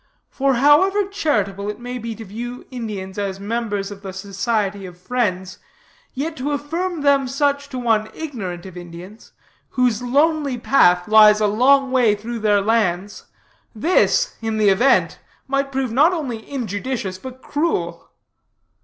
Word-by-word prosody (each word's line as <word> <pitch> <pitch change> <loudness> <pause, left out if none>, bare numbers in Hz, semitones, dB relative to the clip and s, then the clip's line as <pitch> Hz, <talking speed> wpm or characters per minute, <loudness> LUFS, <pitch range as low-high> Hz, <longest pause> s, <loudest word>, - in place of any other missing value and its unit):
For 270 -1 +1
however 370 +10 +4
charitable 210 - -1
it 210 - -6
may 245 +1 -6
be 230 -1 -5
to 225 - -9
view 240 +5 -7
Indians 205 -6 -6
as 195 -1 -3
members 205 -1 -3
of 200 -1 -10
the 190 -2 -7
Society 200 0 -2
of 175 -1 -12
Friends, 185 -3 -2 0.6
yet 310 +4 -3
to 280 +3 -2
affirm 330 +4 -3
them 280 -2 +3
such 280 +1 0
to 260 - -6
one 225 -3 +1
ignorant 200 - -6
of 185 -2 -10
Indians, 175 +4 -11 0.4
whose 250 -3 +1
lonely 285 +1 +1
path 180 -8 +3
lies 215 0 +7
a 215 - +2
long 260 +6 +3
way 240 -5 +3
through 230 +3 -6
their 210 -2 +2
lands, 205 -3 -1 0.5
this, 370 - +2
in 225 -1 -2
the 210 -2 +4
event, 240 +8 +3 0.3
might 275 0 -1
prove 265 -3 -2
not 300 +9 +4
only 250 -10 -5
injudicious 220 -5 -4
but 260 +4 -10
cruel. 310 +4 -2
235 Hz, 150 wpm, -20 LUFS, 200-275 Hz, 0.6 s, lies